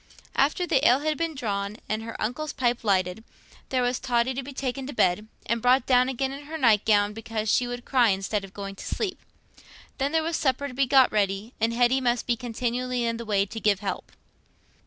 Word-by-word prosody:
After 300 +6 +2
the 275 -5 +1
ale 250 +4 +4
had 310 0 0
been 330 -1 -2
drawn 205 -4 -3
and 215 +1 -2
her 230 0 -7
uncle's 290 +8 -3
pipe 240 -2 0
lighted, 185 0 +1 0.5
there 255 -1 +1
was 245 +1 0
Totty 245 0 +1
to 265 - -3
be 275 +2 -8
taken 260 0 -4
to 290 - -6
bed, 185 +1 +1 0.2
and 235 +1 -1
brought 250 +1 +4
down 255 0 +4
again 265 +1 -1
in 280 +1 -8
her 320 +2 -5
night 225 -8 +4
gown 205 -1 +3
because 220 -1 -3
she 250 - +2
would 245 0 -6
cry 250 -4 +4
instead 195 +1 -1
of 195 - -10
going 195 0 -6
to - - -8
sleep. 395 -4 -3 0.8
Then 275 +1 0
there 320 0 +2
was 330 +1 -1
supper 275 0 0
to 265 - -9
be 270 +1 +1
got 265 -1 +5
ready, 205 +2 -1
and 225 +1 +2
Hetty 245 +3 +3
must 240 -1 0
be 240 - +1
continually 245 +1 -2
in 230 0 -1
the 235 - -7
way 200 -2 +2
to 225 +3 -7
give 205 -3 +2
help. 195 -3 -4
245 Hz, 220 wpm, -26 LUFS, 215-265 Hz, 0.8 s, got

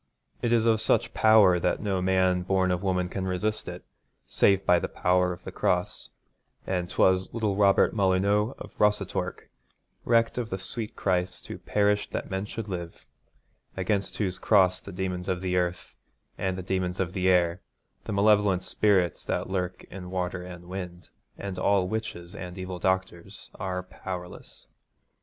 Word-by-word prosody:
It 120 - 0
is 115 -1 +3
of 110 -2 +3
such 110 - +1
power 105 -5 +6
that - - 0
no 100 -3 -1
man 95 -1 +2
born 95 0 +1
of 90 -1 -1
woman 90 -2 0
can 95 +1 -4
resist 105 +4 -1
it, - - -7 0.4
save 100 -1 +3
by 90 -1 +5
the - - -3
power 90 0 +1
of 85 - -8
the - - -7
Cross, - - -1 0.6
and 90 -2 -2
'twas 95 0 +2
little 110 -4 0
Robert 100 -1 +4
Molyneux 100 +3 +2
of - - -10
Rossatorc 105 0 0 0.6
recked 115 +1 +2
of 115 -2 -3
the 95 - -2
sweet 110 +4 -5
Christ 90 -1 -1
who - - -7
perished 105 0 +1
that - - -4
men 95 +1 -2
should 110 +1 -6
live 85 -3 -6 0.7
against 95 +1 -1
whose 95 -4 -2
Cross 95 -4 +3
the 100 - -9
demons 90 -1 -3
of 90 0 -2
earth 90 -1 -1 0.4
and 95 -1 -2
the 95 - -5
demons 90 0 -2
of 95 -1 -2
air, 90 -2 +2 0.4
the - - -4
malevolent 100 -2 +3
spirits 95 -6 +1
that - - -2
lurk 90 -1 -2
in 90 -2 -8
water 90 -1 -2
and 90 -1 -10
wind, 90 -1 -7 0.3
and 95 -2 -5
all 95 -1 +2
witches 90 -5 -5
and 90 0 -8
evil 95 -1 -5
doctors, 95 -2 -2
are 90 -1 -4
powerless. 90 -1 -8
95 Hz, 160 wpm, -27 LUFS, 90-100 Hz, 0.7 s, power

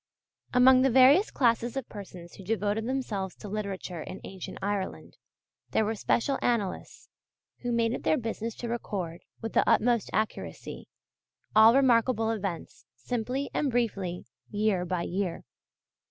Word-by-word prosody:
Among 255 +1 +6
the 270 - +4
various 265 - +6
classes 235 0 +1
of 265 - -3
persons 185 -4 -10
who 195 - -11
devoted 210 +2 -1
themselves 215 -8 -3
to - - -10
Literature 195 -4 -4
in 185 - -7
ancient 190 -2 -8
Ireland, 200 -1 -3 0.5
there 220 - +1
were 220 - 0
special 235 +5 0
Annalists, 230 -6 -2 0.5
who 245 - -3
made 230 0 +1
it - - -4
their 310 - +2
business 230 -1 -4
to 240 - -6
record, 190 -7 -4 0.2
with 225 - -4
the - - +3
utmost 235 -1 +3
accuracy, 215 0 -4 0.7
all 220 +2 +8
remarkable 235 -3 +3
events 195 -6 -5
simply 250 +3 -3
and 290 - +1
briefly, 200 -8 -1 0.2
year 205 -3 0
by 180 -1 -2
year. 180 -1 -3
220 Hz, 140 wpm, -28 LUFS, 195-245 Hz, 0.7 s, all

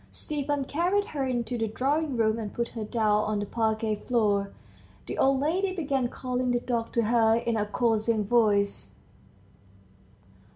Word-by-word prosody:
Stepan 290 -2 -3
carried 360 +8 +1
her 280 -3 -2
into 245 -1 -2
the 225 - 0
drawing 275 +5 -1
room, 220 0 +2
and 210 -3 -6
put 235 0 -1
her 225 - -5
down 210 -1 +1
on 215 0 -1
the 205 - -2
parquette 220 -1 -1
floor. 205 -5 +1 0.5
The - - -5
old 270 0 +3
lady 370 +6 0
began 275 -7 0
calling 250 0 -3
the 245 0 +2
dog 235 -2 -2
to 235 - +2
her 225 0 +3
in 235 0 -1
a 210 -1 0
coaxing 220 -1 +1
voice. 205 -3 +1
235 Hz, 160 wpm, -27 LUFS, 220-270 Hz, 0.5 s, old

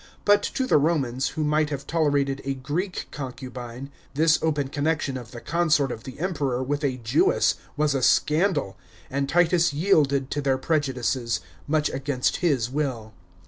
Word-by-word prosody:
But 205 0 +5
to 265 - +1
the 255 - +4
Romans, 135 -4 0
who 155 - +1
might 150 0 +2
have 140 -2 -5
tolerated 145 -4 +1
a 135 0 -2
Greek 155 +9 -3
concubine, 130 -1 -7 0.2
this 160 +1 +4
open 150 -4 0
connection 145 -1 -1
of 120 -3 -7
the 120 -1 -9
consort 150 -5 +1
of 110 - -7
the 130 +2 -9
Emperor 140 -8 -1
wiih 145 +2 -2
a - - -10
Jewess 115 -2 +2 0.2
was 150 -1 +2
a 135 - 0
scandal, 155 - +2 0.4
and 140 +1 -1
Titus 175 -1 +3
yielded 145 -5 +2
to 145 - -1
their 135 -2 +1
prejudices, 130 - 0 0.3
much 150 0 +2
against 135 -1 -1
his 140 -10 +1
will. 125 -5 -3
145 Hz, 160 wpm, -25 LUFS, 130-155 Hz, 0.4 s, But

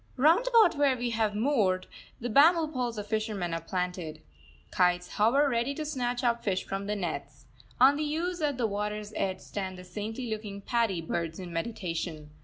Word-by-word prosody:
Round 330 - +4
about 440 -11 +5
where 275 -3 +4
we 240 0 -2
have 220 -2 0
moored, 210 -7 +2 0.3
the 245 - -3
bamboo 315 +6 +5
poles 245 -3 -2
of 205 - -4
fishermen 210 -5 -2
are 165 - -2
planted. 180 -3 -3 0.5
Kites 180 -1 +2
hover 245 +8 +3
ready 245 +2 0
to 310 - -4
snatch 250 -4 -2
up 235 -1 +1
fish 190 -3 0
from 195 +1 -4
the 210 - -1
nets. 155 -7 -5 0.3
On 270 +3 +7
the 300 0 -1
ooze 350 +1 -2
at 290 -4 0
the 240 - +1
water's 210 0 -3
edge 190 -1 -1
stand 190 -2 -5
the 180 - -9
saintly 215 +7 -5
looking 210 -2 -5
paddy 225 -5 0
birds 165 0 -3
in 180 -2 -7
meditation. 165 -5 -4
215 Hz, 185 wpm, -29 LUFS, 185-260 Hz, 0.5 s, On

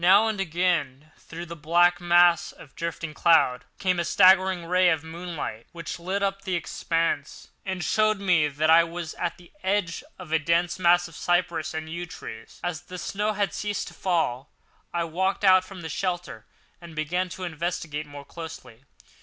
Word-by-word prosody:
Now 195 +5 +7
and 215 -3 -1
again, 160 -5 -1
through 170 +1 -9
the 170 0 -8
black 175 +3 +3
mass 175 -1 +4
of 135 - -15
drifting 165 -1 -4
cloud, 150 -7 +3
came 185 -2 +1
a - - +1
straggling 185 0 +5
ray 180 +1 +4
of 160 -3 +1
moonlight, 160 -8 -6
which 165 0 -6
lit 190 +4 -2
up 195 0 -1
the 190 -2 -2
expanse, 165 -3 -2 0.2
and 190 -2 -2
showed 215 +5 +2
me 175 -6 +3
that 150 +2 +1
I 165 +1 +8
was 170 -1 -5
at 170 - -3
the 175 -1 -18
edge 190 -3 -1
of 180 -4 -10
a 160 - +3
dense 170 +3 +1
mass 175 0 +4
of 165 - -14
cypress 175 -3 0
and 160 0 -4
yew 170 +2 -5
trees. 110 -8 -10
As 175 -2 -3
the 180 +1 -9
snow 210 +4 -1
had 205 -1 -1
ceased 205 -1 -3
to - - -15
fall, 150 -8 -1 0.4
I 170 0 0
walked 190 +5 -1
out 185 -1 +6
from 185 -1 -10
the 160 - -5
shelter 175 - -3 0.3
and 170 -2 -11
began 175 +4 -1
to 185 - -7
investigate 160 -3 -3
more 145 -1 -10
closely. 150 -7 -10
170 Hz, 180 wpm, -26 LUFS, 160-185 Hz, 0.4 s, I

